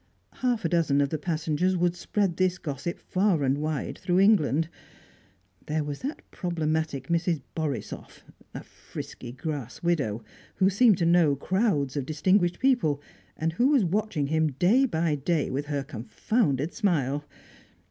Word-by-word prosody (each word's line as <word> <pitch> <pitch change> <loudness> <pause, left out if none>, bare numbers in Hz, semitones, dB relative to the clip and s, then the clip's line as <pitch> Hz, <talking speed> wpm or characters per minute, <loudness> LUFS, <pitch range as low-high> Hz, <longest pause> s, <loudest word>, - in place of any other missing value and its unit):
Half 245 -3 0
a - - +2
dozen 165 -5 +2
of 140 -1 +2
the 155 - -3
passengers 165 +3 0
would 175 0 +1
spread 190 0 -1
this 185 -1 +2
gossip 150 +1 -4
far 185 -5 +1
and 135 +1 +1
wide 155 -2 -3
through 180 0 +1
England. 165 -7 +4 1.0
There 155 0 0
was 145 -1 -5
that 285 +4 -5
problematic 160 -5 -2
Mrs. 170 -2 +1
Borisoff, 145 -9 -5 0.3
a - - -6
frisky 120 - -9
grass 135 -1 -5
widow, 135 -11 0 0.3
who 190 +1 +3
seemed 215 0 +5
to 170 - +1
know 165 -4 +4
crowds 155 - 0
of 140 -3 -2
distinguished 175 +3 +2
people, 245 - +2 0.4
and 160 +1 -1
who 240 +10 +3
was 275 -8 +4
watching 190 -4 0
him 155 0 +1
day 215 - +4
by 165 -6 0
day 150 +2 0
with 140 +3 -3
her 145 -2 -2
confounded 145 - -1
smile! 145 - 0
160 Hz, 150 wpm, -27 LUFS, 145-185 Hz, 1.0 s, seemed